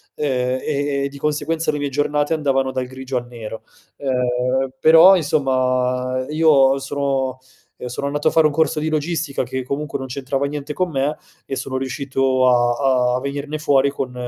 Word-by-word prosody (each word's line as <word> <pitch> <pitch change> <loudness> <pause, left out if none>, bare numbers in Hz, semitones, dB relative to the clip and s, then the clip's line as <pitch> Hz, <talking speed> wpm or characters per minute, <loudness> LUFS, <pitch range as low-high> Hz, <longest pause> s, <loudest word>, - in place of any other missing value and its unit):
ehm, 130 -3 -1
e 140 -1 -1
e 140 - -3
di 140 - -12
conseguenza 150 +2 -1
le 150 - -3
mie 145 0 -2
giornate 145 +2 0
andavano 135 -3 0
dal 130 -1 -2
grigio 130 0 -7
al 120 0 -4
nero. 115 -2 -8 0.3
Ehm, 125 0 0
però, 165 +4 +8
insomma, 130 -4 0
io 145 -4 +4
sono 135 -2 -2 0.4
ehm, 125 - -7
sono 125 +3 -4
andato 145 +1 +1
a - - -6
fare 160 -1 +5
un 150 - -4
corso 160 0 +1
di 155 - -2
logistica 155 -2 -1
che 130 +1 -4
comunque 140 +1 -4
non 130 - -5
c'entrava 135 +1 -2
niente 150 0 -5
con 185 +2 -1
me 145 0 -1 0.3
e 135 - -4
sono 130 - -5
riuscito 130 -1 0
a 125 +1 +2
a - - -2
venirne 140 +3 -4
fuori 140 -2 +3
con 130 -2 -4
135 Hz, 175 wpm, -20 LUFS, 130-150 Hz, 0.4 s, però